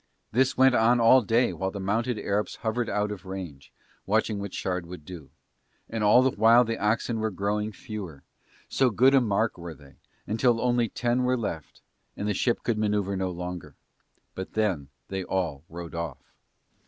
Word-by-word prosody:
This 130 +3 +2
went 130 0 +6
on 120 +1 +4
all 120 +3 +6
day 115 +3 +2
while 95 - -2
the 100 - -7
mounted 115 +5 -1
Arabs 105 +1 -1
hovered 115 +2 0
out 105 0 0
of 105 - -7
range 90 -8 -8 0.4
watching 105 0 +1
what 100 -1 -5
Shard 90 -2 -3
would 90 -4 -10
do; 85 -5 -10 0.6
and 110 -1 -3
all 105 +5 +6
the 130 - +3
while 115 +3 +5
the 115 -1 -3
oxen 110 +2 0
were 110 0 0
growing 105 +2 -2
fewer, 100 - -8 0.4
so 130 -1 +2
good 130 +5 +4
a 135 - +6
mark 110 -2 0
were 85 -2 -7
they, 70 -1 -18 0.3
until 115 +2 +2
only 120 -2 +1
ten 120 +1 0
were 125 0 +1
left, 85 -10 -6 0.3
and 105 - -3
the 105 - +1
ship 120 +4 0
could 115 -3 0
manoeuvre 105 -2 0
no 95 0 -1
longer. 90 -4 -6 0.6
But 95 - -7
then 95 -10 0 0.2
they 95 -1 -3
all 85 -7 -2
rode 85 0 -8
off. 85 -1 -6
105 Hz, 180 wpm, -27 LUFS, 90-115 Hz, 0.6 s, went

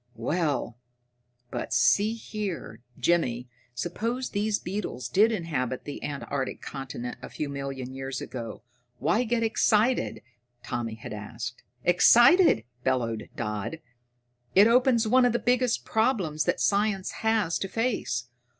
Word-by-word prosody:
"Well, 135 -3 -1 0.7
but - - -3
see 215 +3 +4
here, 210 - -5 0.2
Jimmy, 125 -8 +1 0.3
suppose 230 - -2
these 210 0 0
beetles 180 - -4
did 210 - +4
inhabit 145 - -2
the 145 - -7
antarctic 140 -2 -3
continent 130 -3 -6
a - - -8
few 150 - -4
million 135 -2 -5
years 135 0 -4
ago, 115 -3 -7 0.3
why 170 - +1
get 230 0 0
excited?" 225 +2 +2 0.4
Tommy 115 -2 -3
had 110 - -8
asked. 115 +4 -6 0.2
"Excited?" 240 - +6 0.2
bellowed 115 -4 -1
Dodd. 105 +5 -3 0.8
"It 200 +2 +8
opens 235 -1 +4
one 255 +3 +5
of 245 -2 +3
the - - +3
biggest 250 0 +1
problems 200 - +1
that - - +1
science 200 -1 +1
has 220 -6 +2
to 195 - -2
face. 220 - -1
175 Hz, 125 wpm, -27 LUFS, -, 0.8 s, It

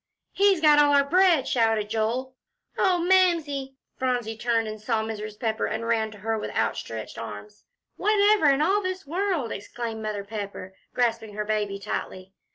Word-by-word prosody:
"He's 395 -4 +3
got 300 -2 +6
all 290 -1 +5
our 280 - +5
bread!" 350 -4 +4
shouted 225 -3 +1
Joel. 235 +4 -1 0.4
"Oh, 370 -2 +2
Mamsie!" 320 -8 +2 0.2
Phronsie 245 -4 -1
turned 230 0 0
and 215 0 -7
saw 220 0 0
Mrs. 215 -1 -6
Pepper, 220 -2 -1
and 220 +1 -3
ran 225 -1 +1
to 215 - -12
her 220 +2 -2
with - - -4
outstretched - - -3
arms. 420 - -9 0.3
"Whatever 415 -4 +4
in 275 +2 +3
all 390 +5 +2
this 370 -2 -4
world," 345 - -1
exclaimed 225 +2 -5
Mother 210 -2 -3
Pepper, 200 -2 -7 0.2
grasping 230 -3 0
her 210 0 -3
baby 210 -2 -1
tightly. 190 -1 -5
235 Hz, 165 wpm, -25 LUFS, 215-310 Hz, 0.4 s, got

